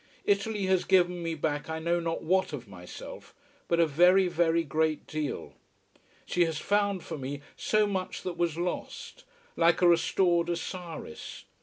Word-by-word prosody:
Italy 205 0 +1
has 185 -1 +2
given 180 -2 +3
me 165 -1 -2
back 145 0 -2
I 160 - -2
know 170 +2 0
not 165 -1 -3
what 185 0 +1
of 125 -5 -6
myself, 90 -2 -10 0.3
but 170 - +1
a 170 - +6
very, 180 +5 +5
very 170 -1 +2
great 155 +1 0
deal. 155 -2 -4 0.7
She 175 - +2
has 160 -2 -3
found 200 +1 0
for 160 - -6
me 140 +2 -5
so 215 0 +2
much 190 -2 -3
that 180 -2 -4
was 170 -2 -1
lost: 180 - -5 0.3
like 170 0 +3
a - - +7
restored 175 0 +3
Osiris. 170 - -6
170 Hz, 160 wpm, -29 LUFS, 160-185 Hz, 0.7 s, a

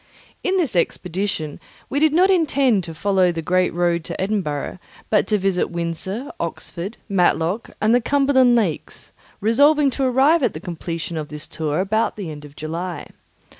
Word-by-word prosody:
In 375 +1 +1
this 305 - 0
expedition 175 -2 -1 0.3
we 285 - -1
did 310 0 +4
not 365 +5 +4
intend 275 - +2
to 165 - -7
follow 190 +1 +2
the 165 -1 -4
great 185 +2 +2
road 170 -1 0
to - - -6
Edinburgh, 185 -5 -2 0.3
but 210 - +3
to 210 - +2
visit 190 -2 0
Windsor, 175 - -3
Oxford, 170 +4 -5
Matlock, 185 +1 +1
and 215 +2 +3
the 245 - +4
Cumberland 265 -2 +4
lakes, 200 -10 -2 0.3
resolving 285 +6 +4
to 270 - -2
arrive 270 +6 +4
at 245 - 0
the - - -4
completion 170 -1 -5
of 155 -1 -4
this 150 -1 -7
tour 155 0 -2
about 215 +4 0
the 190 -6 -5
end 150 -1 -9
of 145 0 -14
July. 165 +1 -5
195 Hz, 170 wpm, -21 LUFS, 170-250 Hz, 0.3 s, did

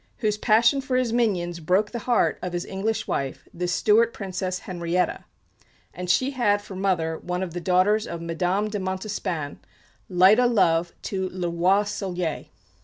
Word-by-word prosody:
whose 215 -3 0
passion 230 +6 +3
for 260 -1 -2
his 250 -3 0
minions 180 -8 0
broke 185 +6 +1
the 235 - -4
heart 240 - +2
of 180 -1 -4
his 175 0 -2
English 205 +3 -2
wife, 135 -1 -3
the 180 +1 -3
Stuart 220 +5 +3
Princess 185 -2 -4
Henriettta; 175 0 -2 0.7
and 180 0 -6
she 260 +9 +2
had 220 -6 +2
for 205 -1 -10
mother 175 -4 0
one 180 +1 -3
of 175 -3 -5
the 175 - -4
daughters 185 +5 +2
of 170 - -5
Madame 180 +5 -1
de 210 -1 -3
Montespan, 185 -5 -3 0.5
light 185 +5 +6
o' 250 - +5
love 170 -7 +2
to 190 -2 -2
le 180 -2 -3
Roi 180 +4 +3
Soleil. 180 -5 -3
190 Hz, 170 wpm, -24 LUFS, 175-210 Hz, 0.7 s, light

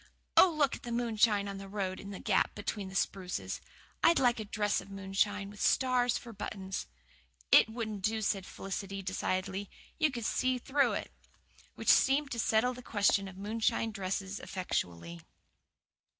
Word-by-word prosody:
Oh, 375 - +8
look 300 -4 +1
at - - -12
the 240 - -6
moonshine 225 -3 +2
on 195 -1 -5
the 195 0 -9
road 190 -2 -3
in 200 - -8
that 195 - -8
gap - - +2
between 205 -1 -4
the 190 - -10
spruces! 185 -2 -2 0.4
I'd 335 - +6
like 245 -2 +3
a 215 - -4
dress 205 0 0
of - - -14
moonshine, 195 +1 -1
with 205 - -10
stars 250 -2 +3
for 235 -1 -9
buttons." 195 -2 -5 0.6
"It - - +7
wouldn't 220 -3 -4
do," 220 +2 0
said 195 -2 -1
Felicity 195 0 -5
decidedly. 190 +1 -2 0.3
"You 310 - +4
could 240 -5 -5
see 255 +2 +1
through 275 +3 +2
it." - - -4 0.6
Which - - -2
seemed 275 +1 +4
to 235 - -3
settle 230 +3 +2
the 250 - -9
question 200 -3 +2
of 190 -1 -10
moonshine 220 +2 0
dresses 195 -1 -3
effectually. 85 - -4
205 Hz, 165 wpm, -32 LUFS, 195-235 Hz, 0.6 s, Oh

